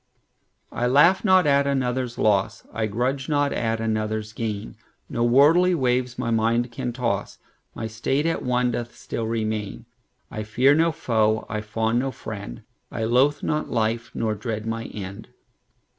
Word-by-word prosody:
I 120 +1 -1
laugh 150 +9 +5
not 185 -4 +5
at 140 -1 +3
another's 125 -3 -1
loss,I 110 +2 0
grudge 130 +6 -2
not 145 -1 +1
at 115 -1 -1
another's 110 -1 -2
gain; 110 -3 -4 0.3
No 120 - -1
worldly 155 +9 +5
waves 125 -3 0
my 120 -2 -2
mind 115 +2 +1
can 120 +1 -3
toss; 115 -5 -2 0.4
My 110 - -4
state 120 +7 -1
at 165 - 0
one 125 0 +1
doth 120 0 -5
still 115 - -4
remain:I 110 - -5
fear 125 +6 +3
no 165 +2 +3
foe, 110 -8 +1
I 105 -1 -2
fawn 110 +2 0
no 135 +2 -1
friend;I 105 - -8
loathe 130 +6 +2
not 150 0 -1
life, 115 +1 -1
nor 110 -1 0
dread 110 0 -4
my 115 0 -3
end. 100 +2 -7
115 Hz, 145 wpm, -24 LUFS, 110-130 Hz, 0.4 s, laugh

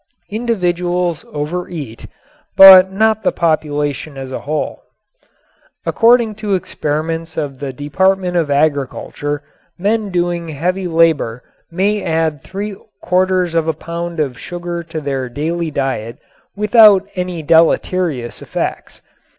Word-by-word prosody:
Individuals 180 -6 -1
overeat, 150 -5 -5 0.5
but 190 -1 +10
not 220 +2 +2
the - - +1
population 150 -3 -1
as 135 -1 -7
a - - -4
whole. 155 +2 -3 1.0
According 230 -1 +3
to 205 -3 0
experiments 165 -1 -3
of 140 -4 -4
the 140 -2 -4
Department 180 +7 0
of 165 -4 +1
Agriculture 145 0 -1 0.3
men 210 +3 0
doing 175 -2 -1
heavy 180 +5 -2
labor 160 -8 +1 0.3
may 200 +4 0
add 160 -4 -1
three 200 +5 -6 0.3
quarters 185 -1 +1
of 165 -1 +1
a 160 - +1
pound 170 +2 -6
of 135 -5 -2
sugar 175 -1 -5
to 165 -1 -6
their 135 -3 -3
daily 160 +5 -2
diet 130 -5 -3 0.4
without 210 -2 +5
any 180 -3 -4
deleterious 160 -4 +1
effects. - - -5
170 Hz, 120 wpm, -17 LUFS, 145-185 Hz, 1.0 s, but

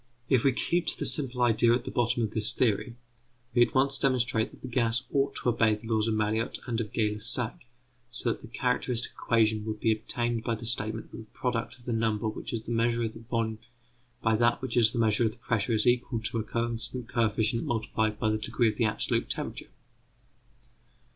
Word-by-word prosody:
If 130 -4 +3
we 135 - +4
keep 170 +6 0
to - - 0
the - - -3
simple 130 -4 +2
idea 115 0 +4
at 120 - -4
the - - -5
bottom 120 0 +1
of 110 - -2
this 110 -1 +4
theory, 120 0 0 0.6
we 120 - +3
at - - -17
once 135 +1 +4
demonstrate 125 -4 +1
that - - -18
the - - -5
gas 120 0 +1
ought 140 -1 +1
to - - 0
obey 110 -2 +3
the 105 +2 -12
laws 110 0 +1
of 110 - 0
Mariotte 110 +1 0
and 115 -2 -1
of 105 - -6
Gay 105 -2 +1
Lussac, 115 +3 +2 0.4
so 120 0 -2
that - - -6
the - - -10
characteristic 125 0 -1
equation 110 -2 +1
would 110 -1 -4
be 115 - +2
obtained 115 +1 -2
by 115 -1 -1
the 115 +1 -9
statement 110 -1 -1
that - - -9
the 110 -1 -12
product 120 -1 -2
of 120 - -19
the 120 - -2
number 110 -1 0
which 110 - -5
is 115 -2 -3
the 120 - -7
measure 115 0 +1
of 110 -1 -3
the - - -11
volume 115 -1 -2 0.6
by 110 -1 +3
that 120 +2 +2
which 130 -3 -4
is 115 -3 +5
the - - -5
measure 110 0 +2
of 110 - -4
the - - -16
pressure 115 0 -1
is 110 -1 +2
equal 120 -1 +1
to 115 +1 -3
a - - -2
constant 115 +1 -1
coefficient 110 0 0
multiplied 110 -1 -1
by 110 - 0
the 110 - -1
degree 115 +2 +1
of - - -5
the 115 - +2
absolute 110 - -1
temperature. - - -4
115 Hz, 220 wpm, -28 LUFS, 110-120 Hz, 0.6 s, is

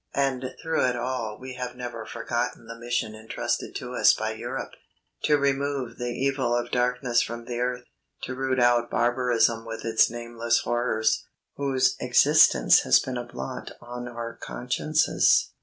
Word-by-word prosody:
And 130 -2 -1
through 160 -1 0
it 125 - 0
all 120 -3 -3
we 130 0 -8
have 125 -1 -5
never 120 -3 -6
forgotten 120 -1 -3
the 115 - -8
mission 120 -2 -2
entrusted 110 +1 -3
to - - -5
us - - +5
by - - -2
Europe - - -5 0.5
to 150 - +4
remove 140 -3 -1
the 120 0 -2
evil 130 -1 0
of 120 0 -2
darkness 125 -1 +1
from 120 0 -5
the 120 0 -4
earth 125 0 -1 0.4
to 130 - -4
root 130 0 -1
out 120 -1 +3
barbarism 120 -2 +2
with 115 0 -7
its 115 -1 +4
nameless 120 0 -1
horrors, 120 -2 0 0.3
whose 135 -2 +1
existence - - +5
has 65 -1 +5
been 130 - -4
a 120 - -3
blot 65 - -7
on 120 0 -7
our 120 -1 -6
consciences. 150 +5 +1
120 Hz, 155 wpm, -26 LUFS, 120-130 Hz, 0.5 s, us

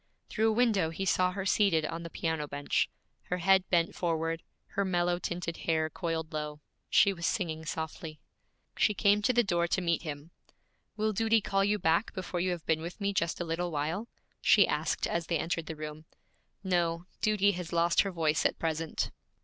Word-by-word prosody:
Through 220 0 +2
a - - +2
window 215 -8 +2
he 180 +4 -4
saw 185 0 +2
her 195 0 -4
seated 190 -5 +3
on 165 0 -4
the 170 - -7
piano 160 -3 -2
bench, 145 0 0 0.4
her 180 - -2
head 190 +1 +3
bent 170 -2 +2
forward, 165 -1 -1 0.3
her 200 - 0
mellow 175 -2 +1
tinted 175 -1 -4
hair 160 -1 0
coiled 165 -2 -3
low. 150 -1 -4 0.3
She 200 - +5
was 170 -2 -2
singing 160 -6 -2
softly. 160 -1 -5 0.6
She 210 - +2
came 205 +2 +4
to 210 - +3
the 240 -1 +3
door 175 -4 +1
to 180 - +1
meet 170 -3 0
him. 150 0 -7 0.7
'Will 215 0 +1
duty 225 +2 +3
call 195 -1 +1
you 205 +1 +2
back 165 +3 +1
before 185 -1 -4
you 185 +1 +1
have 175 -3 -3
been 160 0 +1
with 170 +5 -7
me 200 -1 0
just 170 -3 0
a 175 - -2
little 170 +2 -2
while?' 160 +8 -2 0.3
she - - +6
asked - - 0
as 170 -1 -2
they 170 - +1
entered 165 0 -2
the 160 - -5
room. 155 0 -7 0.6
'No, 175 -2 0 0.2
duty 205 -1 +3
has 180 -3 -6
lost 170 0 +3
her 200 - -1
voice 160 -3 +1
at - - +1
present.' 160 -1 -2
170 Hz, 195 wpm, -30 LUFS, 160-195 Hz, 0.7 s, she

